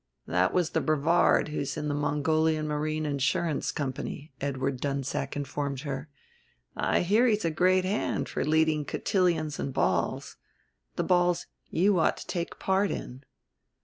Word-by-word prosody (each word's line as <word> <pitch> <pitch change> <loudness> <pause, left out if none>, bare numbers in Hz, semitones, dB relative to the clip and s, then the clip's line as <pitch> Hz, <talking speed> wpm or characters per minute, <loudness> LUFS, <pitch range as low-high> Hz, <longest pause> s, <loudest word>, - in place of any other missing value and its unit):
"That 90 +2 +2
was 180 -3 +1
the - - +1
Brevard 155 +2 +3
who's 145 -1 -3
in 150 -1 -2
the 145 - -1
Mongolian 155 +2 +1
Marine 155 +1 -1
Insurance 145 +2 0
Company," 140 +1 -4
Edward 135 -1 -2
Dunsack 140 0 -2
informed 140 -1 -3
her. 140 0 -5 0.7
"I - - +1
hear 215 +8 +3
he's 215 -5 +1
a 165 - +1
great 185 +3 +3
hand 205 +4 -1
for - - -2
leading 155 0 +2
cotillions 165 -2 0
and 140 - -2
balls - - -1 0.6
the - - 0
balls 175 -1 +2 0.2
you 190 +2 +3
ought - - +2
to - - -8
take 170 -1 -4
part 190 +1 +1
in." 130 +3 -6
155 Hz, 145 wpm, -28 LUFS, 140-175 Hz, 0.7 s, Brevard